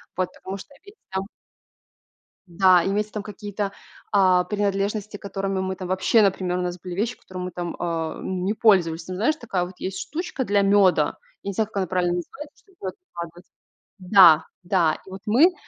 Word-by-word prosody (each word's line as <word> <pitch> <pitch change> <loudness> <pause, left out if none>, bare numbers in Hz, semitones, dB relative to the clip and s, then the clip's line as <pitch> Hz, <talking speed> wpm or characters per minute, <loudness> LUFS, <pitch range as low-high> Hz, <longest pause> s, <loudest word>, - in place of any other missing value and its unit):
Потому 185 +1 -4
что 280 +9 -13
их 405 +1 -15 0.2
там 190 +1 -2 1.2
да, 180 0 +5
имеются 210 +2 -1
там 210 -1 -4
какие-то, 205 -1 -5 0.4
а, 185 -2 +5
принадлежности, 205 0 -1
которыми 195 -1 -3
мы 190 0 -2
там 185 -1 -7
вообще, 190 +4 +3
например, 185 -2 +1
у - - -1
нас 180 0 -3
были 180 -1 -7
вещи, 225 +5 -1
которыми 185 -1 -7
мы 180 - -5
там, 175 0 -4
а, 165 -2 -2
ну, 185 -1 -3
не 205 - +1
пользовались, 180 -7 +3
ну 185 - -3
знаешь, 240 +11 +2
такая 195 - -2
вот 185 - -10
есть 190 0 -4
штучка 315 -5 -4
для 200 0 +3
мёда, 195 -2 +4 0.3
я 200 - -3
не - - -3
знаю, 215 +2 0
как 210 - -8
она 190 -2 0
правильно 180 -1 +1
называется, 290 - -7
чтобы 385 -3 -27
в - - -20
мёд 185 - -3 0.2
выкладывать. 170 +1 -8 0.5
Да-да, 175 -2 +5
и - - -13
вот 190 +1 -8
мы 280 - +5
190 Hz, 190 wpm, -24 LUFS, 180-205 Hz, 1.2 s, да